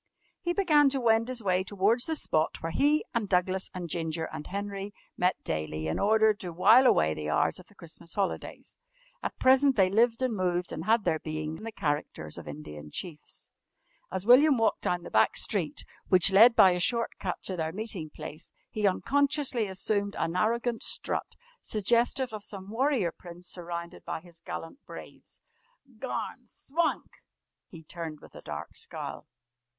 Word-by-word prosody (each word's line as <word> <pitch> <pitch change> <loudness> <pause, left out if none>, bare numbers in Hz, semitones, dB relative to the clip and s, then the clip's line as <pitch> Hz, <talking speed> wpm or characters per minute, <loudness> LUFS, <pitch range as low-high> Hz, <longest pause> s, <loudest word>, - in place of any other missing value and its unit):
He 345 - -1
began 310 -7 +4
to 270 0 -1
wend 230 -1 +3
his 250 -3 -3
way 185 -1 +2
towards 205 +5 +1
the 320 - -1
spot 155 - 0
where 165 - -2
he, 295 - +2
and 220 -4 -1
Douglas, 185 +1 +1
and 180 -2 -6
Ginger, 160 0 -2
and 150 - -6
Henry 200 +1 -5 0.2
met 180 +1 0
daily 80 0 -3
in 80 - -1
order 220 +1 +4
to 185 -4 -7
wile 220 +10 +6
away 80 - +4
the 75 -1 -5
hours 80 - +1
of 185 - -14
the 205 - -18
Christmas 170 -1 -7
holidays. 200 -2 -3 0.4
At - - -4
present 265 +1 +5
they 190 -3 +3
lived 230 +3 +3
and 250 -3 0
moved 180 -2 -1
and 160 - -5
had 225 +1 +3
their 160 - +1
being 155 0 -4
in 190 - -11
the 225 - -4
characters 145 - -3
of - - -11
Indian 75 0 -8
Chiefs. 155 - -7 0.6
As 190 - -2
William 265 +4 +7
walked 225 -1 +1
down 180 -1 -1
the - - -9
back 110 0 +3
street, 180 -8 -1 0.2
which 185 0 +6
led 225 +5 +7
by 190 - +7
a 180 - -1
short 235 +6 +1
cut 180 -2 -3
to 190 - -3
their 160 -2 -2
meeting 190 -5 -5
place, 155 +1 -9 0.2
he 210 -1 +1
unconsciously 275 +2 +1
assumed 200 +1 -1
an 165 +1 -1
arrogant 230 +4 0
strut, - - -1 0.3
suggestive 235 +4 +1
of 210 -1 -6
some 195 -1 -7
warrior 245 - +1
prince 175 +1 -12
surrounded 170 -1 -7
by - - -4
his 170 0 -15
gallant 170 - -8
braves. - - -12 0.6
"Garn! - - -5
Swank!" 325 +4 -3 0.5
He 165 -2 -12
turned 160 -1 -7
with - - -16
a - - -11
dark - - -7
scowl. - - -7
195 Hz, 175 wpm, -29 LUFS, 170-230 Hz, 0.6 s, William